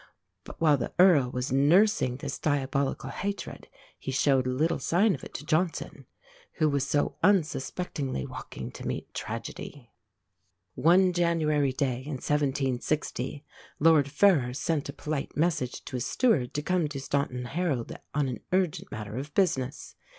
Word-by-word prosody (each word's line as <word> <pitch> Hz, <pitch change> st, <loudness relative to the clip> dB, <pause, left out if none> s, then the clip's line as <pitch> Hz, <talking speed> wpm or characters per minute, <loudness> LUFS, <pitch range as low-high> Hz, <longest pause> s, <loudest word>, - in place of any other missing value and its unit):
But -, -, -11 dB
while 155 Hz, -3 st, +4 dB
the 125 Hz, -, -4 dB
Earl 175 Hz, -9 st, +6 dB
was 125 Hz, 0 st, -3 dB
nursing 145 Hz, -, +4 dB
this 140 Hz, -1 st, -5 dB
diabolical 140 Hz, -2 st, -1 dB
hatred, 200 Hz, +1 st, -5 dB, 0.3 s
he -, -, -6 dB
showed 135 Hz, -1 st, +2 dB
little 145 Hz, +6 st, +1 dB
sign 195 Hz, +5 st, +3 dB
of 140 Hz, -, -7 dB
it -, -, -9 dB
to 145 Hz, -, -6 dB
Johnson, 155 Hz, -5 st, -1 dB, 0.5 s
who 155 Hz, -, +2 dB
was 140 Hz, -1 st, 0 dB
so 145 Hz, +1 st, 0 dB
unsuspectingly 155 Hz, -, 0 dB
walking -, -, -7 dB
to -, -, -7 dB
meet -, -, -4 dB
tragedy. 125 Hz, -5 st, -7 dB, 0.8 s
One 180 Hz, +3 st, +4 dB
January 155 Hz, -5 st, +2 dB
day, 130 Hz, -2 st, -1 dB
in 145 Hz, +3 st, -6 dB
1760, 135 Hz, 0 st, -1 dB, 0.3 s
Lord 150 Hz, -2 st, +5 dB
Ferrers 145 Hz, -6 st, +3 dB
sent 155 Hz, -4 st, -1 dB
a -, -, -4 dB
polite 150 Hz, -2 st, -4 dB
message 150 Hz, -6 st, 0 dB
to 130 Hz, -, -6 dB
his 120 Hz, -, -2 dB
steward 185 Hz, -, +1 dB
to 150 Hz, -, -1 dB
come 180 Hz, -1 st, +1 dB
to 145 Hz, -1 st, -6 dB
Staunton 135 Hz, -2 st, -2 dB
Harold 140 Hz, -4 st, -2 dB, 0.2 s
on 145 Hz, -2 st, +2 dB
an 125 Hz, -, -4 dB
urgent 185 Hz, -4 st, 0 dB
matter 105 Hz, +1 st, -6 dB
of 145 Hz, +3 st, -7 dB
business. 140 Hz, -9 st, 0 dB
145 Hz, 150 wpm, -28 LUFS, 130-165 Hz, 0.8 s, Earl